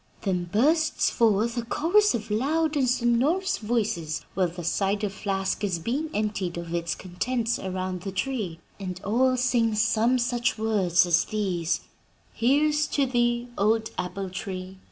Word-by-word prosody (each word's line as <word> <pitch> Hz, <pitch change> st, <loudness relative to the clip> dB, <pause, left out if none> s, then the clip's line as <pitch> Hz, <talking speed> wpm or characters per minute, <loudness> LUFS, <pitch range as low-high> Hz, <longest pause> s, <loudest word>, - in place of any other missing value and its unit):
Then 180 Hz, -3 st, 0 dB
bursts 295 Hz, -, +2 dB
forth 230 Hz, +1 st, +2 dB
a -, -, +1 dB
chorus 350 Hz, -, +3 dB
of 220 Hz, -2 st, -5 dB
loud 305 Hz, +8 st, +1 dB
and 265 Hz, -4 st, +2 dB
sonorous 260 Hz, +11 st, +1 dB
voices 210 Hz, -9 st, -1 dB
while 185 Hz, -2 st, +2 dB
the 175 Hz, +1 st, -8 dB
cider 200 Hz, +4 st, 0 dB
flask 195 Hz, 0 st, -2 dB
is 190 Hz, -4 st, 0 dB
being 265 Hz, -, -2 dB
emptied 205 Hz, -, -2 dB
of 170 Hz, -1 st, -6 dB
its 170 Hz, -1 st, -1 dB
contents 230 Hz, +6 st, -2 dB
around 185 Hz, -1 st, -3 dB
the 195 Hz, -, -5 dB
tree, 195 Hz, -5 st, -3 dB, 0.2 s
and 185 Hz, -2 st, -5 dB
all 255 Hz, +5 st, +2 dB
sing 240 Hz, -3 st, +2 dB
some 225 Hz, +3 st, +3 dB
such 245 Hz, 0 st, 0 dB
words 195 Hz, -5 st, +2 dB
as 175 Hz, -1 st, +3 dB
these: 185 Hz, -6 st, -1 dB, 0.5 s
"'"Here's 295 Hz, +5 st, +2 dB
to 280 Hz, -, +1 dB
thee, 240 Hz, -1 st, 0 dB
old 220 Hz, +2 st, +2 dB
apple 185 Hz, +1 st, -4 dB
tree! 185 Hz, 0 st, -6 dB
215 Hz, 150 wpm, -26 LUFS, 185-250 Hz, 0.5 s, chorus